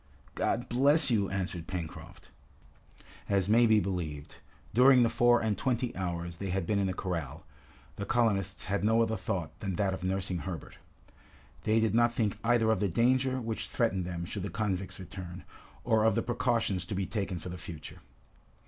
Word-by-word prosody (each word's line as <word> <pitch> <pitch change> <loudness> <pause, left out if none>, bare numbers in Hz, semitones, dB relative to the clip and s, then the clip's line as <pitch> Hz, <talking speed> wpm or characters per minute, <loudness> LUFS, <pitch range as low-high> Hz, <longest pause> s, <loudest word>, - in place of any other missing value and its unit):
"God 120 - -1
bless 140 +3 +4
you!" 100 -4 +2
answered 90 -4 -3
Pencroft. 85 -4 -7 1.0
As 100 -2 +2
may 115 +3 +5
be 110 -1 +5
believed, 80 -8 -4 0.4
during 125 +2 +7
the 115 - +3
four 120 0 +4
and 110 -2 0
twenty 120 +3 -1
hours 85 -2 -4
they 100 +1 -4
had 95 -1 -1
been 100 +3 +1
in 100 - +1
the 95 - -1
corral, 80 -6 -4 0.5
the 100 - -3
colonists 100 -5 +1
had 100 +1 -1
no 110 +2 +4
other 110 0 -1
thought 90 -5 -3
than 95 -3 -3
that 95 +1 +1
of 95 - -6
nursing 95 -1 -1
Herbert. 85 -3 -7 0.9
They 110 +1 +3
did 110 -2 +1
not 120 +1 +4
think 110 -4 0
either 115 -1 +3
of 110 - +1
the 100 - +1
danger 130 +6 +2
which 115 -2 -4
threatened 95 -7 0
them 85 -1 -4
should 100 +3 -5
the 100 - -3
convicts 95 -3 -3
return, 90 -2 -8 0.4
or 110 -2 +3
of 110 - +3
the 115 - +1
precautions 120 -6 0
to 100 - -4
be 95 0 -1
taken 100 -3 -3
for 85 +2 -7
the 90 0 -7
future. 80 -2 -9
100 Hz, 185 wpm, -30 LUFS, 90-115 Hz, 1.0 s, during